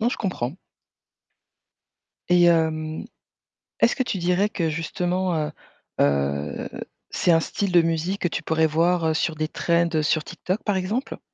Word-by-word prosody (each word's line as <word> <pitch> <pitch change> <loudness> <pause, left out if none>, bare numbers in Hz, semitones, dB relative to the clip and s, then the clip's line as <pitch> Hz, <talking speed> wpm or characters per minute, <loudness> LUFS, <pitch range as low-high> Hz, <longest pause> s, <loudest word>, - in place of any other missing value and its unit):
non, 230 - +2
je 250 - -2
comprends. 165 - -3 1.7
Et 175 0 +5
hem 160 -1 +1 0.8
est-ce - - +4
que 260 - +2
tu 205 -6 -2
dirais 180 +4 +2
que, 165 -6 -1
justement, 175 +3 -1
heu 150 - -7 0.5
heu, 70 +1 0 0.4
c'est 175 - +2
un 165 - +5
style 200 +3 -2
de 175 -1 +6
musique 165 +4 -1
que 175 - +2
tu - - -4
pourrais 160 0 +2
voir, 165 +2 +2
heu, 160 - +1
sur 160 0 0
des 155 0 -1
trends 170 +1 +1
sur 155 +1 +1
TikTok, 185 +2 -4
par 205 -3 +1
exemple? 210 +8 -2
170 Hz, 160 wpm, -24 LUFS, 155-185 Hz, 1.7 s, de